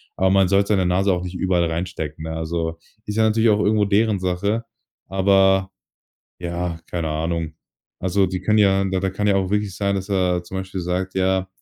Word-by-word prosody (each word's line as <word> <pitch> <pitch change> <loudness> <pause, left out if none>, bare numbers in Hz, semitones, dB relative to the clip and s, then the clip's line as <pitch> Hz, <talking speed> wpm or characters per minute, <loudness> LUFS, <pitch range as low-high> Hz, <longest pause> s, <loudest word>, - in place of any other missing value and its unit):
Aber 95 0 +2
man 95 0 +4
sollte 100 +2 +2
seine 95 -3 +2
Nase 95 +3 +2
auch 90 -1 -1
nicht 90 0 -6
überall 90 -1 +1
reinstecken, 80 -2 -4
ne? 80 - -4
Also, 80 0 -3 0.3
ist 105 +1 -4
ja 110 - +4
natürlich 110 +1 +3
auch 105 -1 +3
irgendwo 105 0 +2
deren 105 0 +2
Sache. 95 +5 -1 0.5
Aber, 95 0 +3 0.7
ja, 85 -1 -3
keine 85 -2 -2
Ahnung. 80 0 -2 0.5
Also, 95 +1 +2
die 90 0 -3
können 105 +3 +2
ja 95 -2 +4
da 95 -1 -1
da 95 - 0
kann 105 +2 -2
ja 100 - +3
auch 95 -1 0
wirklich 105 -2 -1
sein, 100 -1 0
dass 95 0 -4
er 90 -2 +1
zum 90 +2 -6
Beispiel 95 0 -5
sagt: 90 +2 -2
„Ja, 95 0 +1
95 Hz, 200 wpm, -22 LUFS, 90-100 Hz, 0.7 s, man